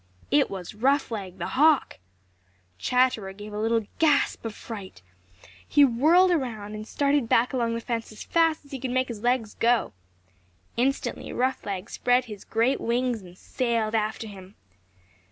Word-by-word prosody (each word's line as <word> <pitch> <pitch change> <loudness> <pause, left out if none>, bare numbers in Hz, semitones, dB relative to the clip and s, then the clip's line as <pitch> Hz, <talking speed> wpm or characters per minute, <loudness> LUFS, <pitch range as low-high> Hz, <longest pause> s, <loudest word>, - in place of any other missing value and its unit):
It 290 -1 +4
was 185 -1 -7
Roughleg 220 -6 0
the 170 - -4
Hawk! 295 +1 +3 0.8
Chatterer 250 -6 +1
gave 205 +1 -10
a 210 - -3
little 225 0 +1
gasp 300 -3 +2
of 220 -2 -4
fright. 195 - -9 0.6
He 290 - +6
whirled 315 +10 +4
around 225 -10 -2
and 215 0 -7
started 280 -3 +1
back 240 +4 +3
along 235 -2 0
the 230 - -3
fence 230 -2 -3
as 215 - -9
fast 325 -3 +1
as 280 - -19
he 270 - -5
could 260 +1 -3
make 255 +1 0
his 225 -3 -6
legs 240 -2 0
go. 235 0 +1 0.8
Instantly 265 +4 -1
Roughleg 210 -6 -2
spread 245 +1 +1
his 210 -4 -9
great 230 +4 +1
wings 240 -1 0
and 180 -1 -14
sailed 230 -2 -1
after 220 0 -1
him. 195 -2 -11
235 Hz, 155 wpm, -26 LUFS, 215-260 Hz, 0.8 s, He